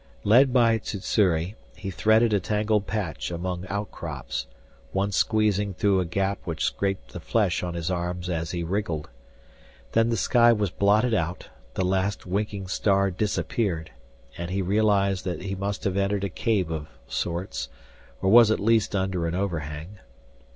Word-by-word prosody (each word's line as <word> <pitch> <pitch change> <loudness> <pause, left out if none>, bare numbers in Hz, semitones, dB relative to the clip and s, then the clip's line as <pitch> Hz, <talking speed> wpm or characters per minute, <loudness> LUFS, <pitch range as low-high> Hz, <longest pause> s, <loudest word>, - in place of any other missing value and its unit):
Led 125 +5 +6
by 115 -3 +4
Sssuri, 95 -3 0 0.2
he 95 -2 -5
threaded 110 +3 +3
a 100 - +4
tangled 105 +2 0
patch 95 -9 -3
among 90 +1 -4
outcrops, 90 -8 -4 0.5
once 100 0 0
squeezing 105 -3 +1
through 100 0 +2
a 90 - 0
gap 95 +3 -1
which 80 -3 -3
scraped 95 -11 -2
the - - -5
flesh 100 -6 +1
on 90 -1 -4
his 85 +1 -2
arms 90 0 -3
as 85 -2 -2
he 85 -1 -3
wriggled. 85 -5 -2 0.8
Then 115 +1 +3
the 115 - 0
sky 120 +3 +5
was 105 -5 -1
blotted 105 +5 +3
out, 90 -3 -2 0.3
the 95 - 0
last 95 +2 0
winking 100 +1 -2
star 100 +1 +2
disappeared, 95 - -1 0.5
and 85 0 -4
he 95 +1 -1
realized 100 -1 +2
that 90 -1 -3
he 95 0 -3
must 100 +1 -3
have 95 -3 0
entered 100 0 0
a 100 - -1
cave 95 -3 0
of 75 -2 -4 0.2
sorts, 85 -8 -3 0.5
or 95 - +3
was 115 -1 +8
at 110 - +2
least 110 0 +2
under 95 -3 0
an 85 - -2
overhang. 85 0 -4
95 Hz, 160 wpm, -26 LUFS, 90-105 Hz, 0.8 s, was